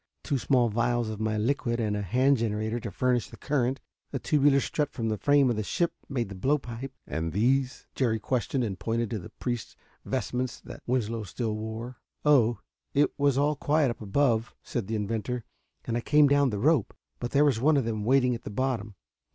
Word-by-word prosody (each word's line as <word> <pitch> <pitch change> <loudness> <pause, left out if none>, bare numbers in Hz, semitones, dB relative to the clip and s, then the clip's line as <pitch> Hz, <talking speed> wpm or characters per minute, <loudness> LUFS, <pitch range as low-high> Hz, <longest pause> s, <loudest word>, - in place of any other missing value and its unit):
Two 140 - 0
small 125 -2 +3
vials 120 +1 0
of 110 -1 -5
my 110 0 0
liquid 120 +1 0
and 105 -2 0
a 105 - -2
hand 130 +8 +3
generator 110 0 -1
to 115 - -5
furnish 125 +3 0
the - - -12
current. 135 -2 0 0.3
A 140 - -2
tubular 140 0 +3
strut 145 +1 -1
from 115 -3 -2
the 110 - -1
frame 145 -1 +4
of 120 - +1
the - - 0
ship 170 - 0 0.2
made 125 -5 -1
the - - -6
blow 130 +11 +1
pipe." 125 0 -7
"And 80 +1 -3
these?" 130 +6 +1
Jerry 115 -4 +1
questioned, 125 +3 -1
and 100 -5 -3
pointed 115 -1 -1
to 110 - -2
the 85 - -10
priest's 120 -3 -4 0.3
vestments 125 0 -2
that - - -10
Winslow 115 -2 0
still 110 +3 -3
wore. 110 +3 -6 0.3
"Oh, 120 -6 +5 0.4
it 145 +1 +4
was 140 -2 +2
all 145 +2 +2
quiet 145 -2 +2
up 115 - -9
above," 115 +1 +1
said 115 -6 -3
the 110 - -2
inventor, 115 +3 -2 0.4
"and 115 - -2
I 120 - 0
came 150 +3 +5
down 140 -1 +4
the 105 - -2
rope. 140 +1 +2 0.2
But 120 - -3
there 145 +3 +4
was 130 -6 +2
one 150 +2 +4
of 135 - +1
them 110 -2 -2
waiting 125 +1 +3
at 115 - -5
the - - -7
bottom. 110 -2 -2
120 Hz, 210 wpm, -28 LUFS, 110-135 Hz, 0.4 s, Oh